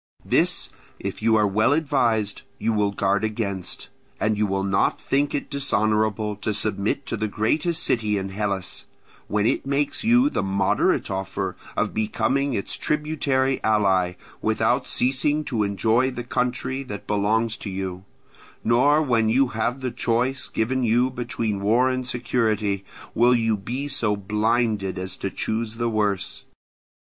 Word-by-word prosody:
This, - - +1 0.3
if - - -5
you 110 0 +4
are 105 -1 +4
well 110 +6 +3
advised, 120 -9 +1 0.2
you 115 - 0
will 105 -1 +2
guard 100 +1 0
against; 105 -4 -3 0.3
and 110 0 +1
you 105 0 +1
will 95 0 -1
not 95 -1 +1
think 140 +2 0
it 145 - -3
dishonourable 110 -5 0
to 105 0 -2
submit 105 +5 -1
to 140 - -3
the 110 -1 -1
greatest 155 - 0
city 110 -4 +1
in 95 0 -3
Hellas, 100 -1 -3 0.4
when 105 0 +1
it - - +1
makes 140 +6 0
you 245 +4 +5
the - - 0
moderate 95 0 +1
offer 95 0 -3 0.2
of - - 0
becoming 115 +5 0
its 100 - -2
tributary 140 -3 0
ally, 95 -4 +2 0.3
without 110 +4 +1
ceasing 145 +4 +1
to 120 -7 -2
enjoy 110 +5 +2
the 125 -2 -5
country 125 +2 -1
that 105 -7 -7
belongs 110 +2 +1
to 105 - -6
you; 95 -1 -4 0.6
nor 140 +7 +4
when 115 -5 +2
you 130 +3 +3
have 120 +4 -2
the 130 -1 -2
choice 120 +3 0
given 130 +3 -1
you 120 +3 +3
between 115 -4 -2
war 115 +6 +3
and 130 -1 -2
security, 110 -5 0 0.3
will 120 +2 +5
you 115 -2 +2
be 120 +8 -4
so 120 -7 0
blinded 105 0 0
as 95 0 -4
to 95 - -3
choose 110 +3 -3
the 120 0 -1
worse. 105 -4 -1
110 Hz, 155 wpm, -24 LUFS, 105-130 Hz, 0.6 s, you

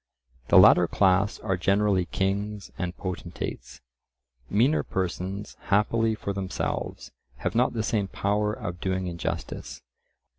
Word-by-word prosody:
The - - +6
latter 90 -1 +8
class 95 +2 +2
are 95 -3 0
generally 95 +1 +2
kings 100 +2 -2
and 90 0 -4
potentates; 95 -2 -6 0.7
meaner 130 +9 +3
persons, 95 +2 -4
happily 110 +2 +2
for 100 -2 -4
themselves, 95 -1 -4 0.3
have - - -2
not 125 +2 +2
the 110 -2 -1
same 105 -3 0
power 105 +2 0
of 90 -4 -6
doing 95 -1 -1
injustice. 85 -7 -5
100 Hz, 120 wpm, -26 LUFS, 95-105 Hz, 0.7 s, latter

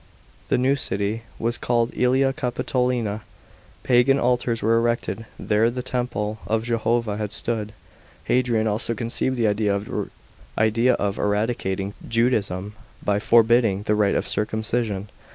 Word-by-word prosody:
The - - +3
new 130 +3 +3
city 105 -3 -2 0.2
was 115 +1 -1
called 120 -1 +1
^Elia 135 +2 +2
Capitolina; 125 -5 -1 0.6
pagan 125 +2 +4
altars 120 -2 0
were 115 +2 +3
erected 115 -1 -1
where 110 +2 +2
the 125 +1 -4
temple 120 -4 -2
of 110 0 0
Jehovah 115 -2 0
had 105 -2 -3
stood. 110 -1 -3 0.5
Hadrian 120 -3 +1
also 110 +2 0
conceived 120 +3 0
the 115 - +1 1.1
idea 115 +3 +3
of 100 -1 -2
eradicating 105 -2 -1
Judaism 105 -5 0 0.3
by 100 0 +2
forbidding 115 -3 +4
the 105 - +1
rite 105 -2 +2
of - - -1
circumcision. 110 -1 -2
115 Hz, 125 wpm, -23 LUFS, 105-120 Hz, 1.1 s, pagan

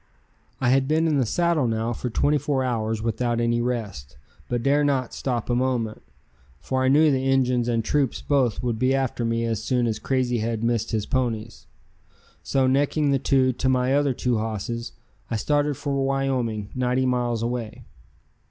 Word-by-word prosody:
I 125 - +1
had 135 +1 +3
been 160 +2 +2
in 155 -3 +2
the 125 - +1
saddle 170 -2 +1
now 115 +1 -1
for 125 - -4
twenty 145 +6 +2
four 140 -1 0
hours 110 -3 -1
without 120 +1 -1
any 120 0 +1
rest, 105 - -4 0.3
but 120 -1 -1
dare 145 +2 +3
not 135 -4 0
stop 120 -4 -2
a 120 - 0
moment, 120 -3 -1 0.6
for 130 - -1
I - - +2
knew 150 +3 +5
the 135 0 0
Injuns 125 -2 +2
and 115 -2 0
troops 140 -2 0
both 130 -6 0
would 120 -3 -1
be 130 +2 +2
after 130 -3 -1
me 115 0 0
as 115 -2 -2
soon 125 0 +1
as 110 -2 -1
Crazy 125 -3 0
Head 115 0 -2
missed 115 -1 0
his 110 -3 -1
ponies. 115 -3 -2 0.7
So 135 -1 +1
necking 140 +2 +2
the 135 - +2
two 130 -1 +2
to 130 +2 -1
my 130 0 +2
other 140 -2 +2
two 120 -3 0
hosses 115 +2 -4 0.4
I 115 - -2
started 145 +4 0
for 140 -1 -3
Wyoming, 135 -6 -1
ninety 130 +1 0
miles 120 -2 0
away. 115 -2 -4
125 Hz, 180 wpm, -24 LUFS, 115-135 Hz, 0.7 s, knew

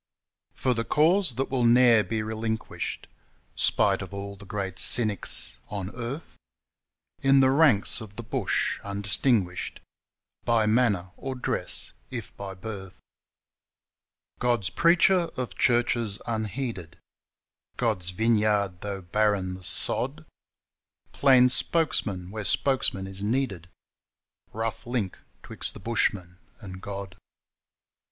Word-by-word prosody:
For 130 - 0
the 115 -1 -2
cause 160 - +3
that 135 +2 -3
will 130 -2 0
ne'er 120 -2 +5
be 110 +3 -3
relinquished 110 0 -4 0.5
Spite - - +2
of 100 - -8
all 100 0 -6
the 100 0 -14
great 95 -2 -4
cynics 110 -5 +4
on 100 -1 -5
earth 125 +6 -7 0.8
In 135 0 +4
the 130 0 +4
ranks 135 -7 +4
of 105 -2 -11
the 120 - -7
bush 110 - -1
undistinguished 100 -1 0 0.6
By 115 -2 +2
manner 105 -5 +1
or 135 -1 -5
dress 125 - 0 0.2
if - - -7
by 95 -1 -7
birth 95 -2 -8 1.4
God's 120 -7 0
preacher, 170 - +3
of 125 -6 -4
churches 120 -3 +1
unheeded 110 -5 -4 0.8
God's 90 -1 0
vineyard, 105 -2 +1
though 100 -2 -5
barren 100 0 0
the 95 0 -8
sod - - +4 0.9
Plain 130 -2 +5
spokesman 105 - -1
where 110 0 -5
spokesman 115 -5 +1
is 95 0 -8
needed 105 -6 -2 0.8
Rough 115 +1 -5
link 120 -6 -3 0.2
'twixt - - -4
the - - -9
bushman 95 -4 -2 0.2
and 95 -3 -10
God. 100 -2 -7
110 Hz, 115 wpm, -26 LUFS, 95-125 Hz, 1.4 s, ne'er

